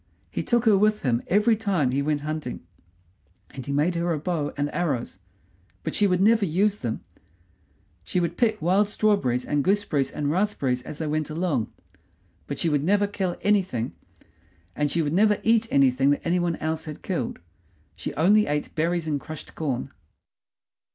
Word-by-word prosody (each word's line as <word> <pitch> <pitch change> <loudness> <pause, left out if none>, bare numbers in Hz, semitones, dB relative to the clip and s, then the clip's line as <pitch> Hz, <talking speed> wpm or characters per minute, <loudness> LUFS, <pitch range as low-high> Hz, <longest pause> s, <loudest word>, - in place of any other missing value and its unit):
He - - -2
took 240 -1 +1
her 220 -2 +6
with 210 +2 +2
him 120 -3 +1
every 210 +4 +4
time 190 - 0
he 135 +2 0
went 145 0 0
hunting, 155 - -5 0.9
and 130 - -7
he - - -2
made 150 +5 +2
her 170 0 -1
a 160 - 0
bow 155 -1 -2
and 145 0 0
arrows, 150 -7 -2 0.6
but - - -3
she 205 - +3
would 180 -2 +1
never 220 +1 +4
use 200 +4 +1
them; 115 -3 -3 1.0
she 180 - -1
would 170 -1 -1
pick 220 0 +1
wild 195 +4 +3
strawberries 200 - +1
and 145 -1 0
gooseberries 190 -8 +1
and 145 -1 -2
raspberries 155 -9 0
as 145 - -8
they 160 - -3
went 155 0 -1
along, 155 -7 -1 0.8
but 140 - -4
she - - -1
would 145 -3 +1
never 205 +4 +3
kill 195 -3 -2
anything; 190 - +1 0.8
and 150 0 0
she 165 +3 0
would 150 0 -1
never 210 +3 +4
eat 225 0 +3
anything 135 0 +3
that 145 - 0
any 175 +1 +2
one 175 -1 0
else 160 +1 -3
had 155 -2 -8
killed. 165 -11 -2 0.6
She - - -5
only 210 +7 +4
ate 150 0 -2
berries 165 +1 0
and 145 -2 0
crushed 155 -1 -9
corn. 135 -4 -3
165 Hz, 180 wpm, -25 LUFS, 145-200 Hz, 1.0 s, her